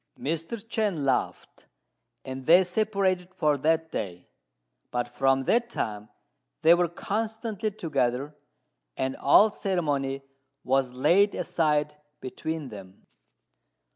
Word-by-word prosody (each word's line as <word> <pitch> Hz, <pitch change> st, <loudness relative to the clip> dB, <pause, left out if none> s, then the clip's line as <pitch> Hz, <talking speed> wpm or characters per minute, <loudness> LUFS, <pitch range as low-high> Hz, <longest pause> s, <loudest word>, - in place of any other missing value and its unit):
Mr. 165 Hz, -, -3 dB
Chên 210 Hz, -, -1 dB
laughed, 135 Hz, -2 st, -2 dB, 0.6 s
and 130 Hz, 0 st, -7 dB
they 175 Hz, +3 st, +7 dB
separated 190 Hz, -2 st, 0 dB
for 150 Hz, -2 st, +2 dB
that 160 Hz, +3 st, 0 dB
day; 90 Hz, -3 st, -5 dB, 0.6 s
but 120 Hz, -1 st, -2 dB
from 135 Hz, +2 st, +1 dB
that 235 Hz, -, +1 dB
time 105 Hz, -, -4 dB, 0.5 s
they 165 Hz, +2 st, +8 dB
were 175 Hz, 0 st, +3 dB
constantly 220 Hz, +4 st, -3 dB
together, 145 Hz, -, -2 dB, 0.6 s
and 130 Hz, 0 st, -1 dB
all 210 Hz, +9 st, +5 dB
ceremony 145 Hz, -9 st, -1 dB, 0.4 s
was 130 Hz, -1 st, +1 dB
laid 175 Hz, +11 st, +3 dB
aside 150 Hz, -2 st, 0 dB, 0.3 s
between 150 Hz, +2 st, -5 dB
them. 95 Hz, -4 st, -12 dB
155 Hz, 110 wpm, -27 LUFS, 135-190 Hz, 0.6 s, they